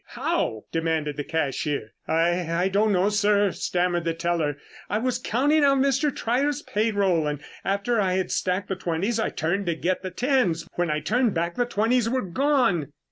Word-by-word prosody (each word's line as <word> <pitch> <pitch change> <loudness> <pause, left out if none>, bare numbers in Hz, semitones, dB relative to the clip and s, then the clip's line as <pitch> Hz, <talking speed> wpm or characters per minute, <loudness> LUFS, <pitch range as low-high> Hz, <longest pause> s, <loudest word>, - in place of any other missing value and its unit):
How?" 110 -1 -1
demanded 160 -3 -1
the 145 - -3
cashier. 145 -6 -2 0.2
"I 170 +1 +1
I 180 +3 +1
don't 210 +3 +2
know, 190 +1 +3
sir," 205 -1 +2
stammered 175 -1 -1
the 165 0 -1
teller. 165 -4 -1 0.3
"I 205 - 0
was 245 +2 -1
counting 290 +6 +2
out 275 -1 +4
Mr. 275 +2 +2
Trier's 280 +5 -1
payroll, 200 -7 +1
and 145 -1 -2 0.2
after 200 +4 0
I 185 -2 +1
had 185 -1 -1
stacked 185 +1 -1
the 190 - -1
twenties 185 +6 -1
I 220 - 0
turned 190 +4 -2
to 170 - +1
get 180 +3 -1
the 185 - -4
tens. 210 - 0
When 175 -1 -1
I 150 0 0
turned 240 +1 +1
back 170 +1 -1
the 245 - 0
twenties 230 +1 +1
were 255 0 0
gone." 195 - +1
190 Hz, 185 wpm, -25 LUFS, 165-235 Hz, 0.3 s, out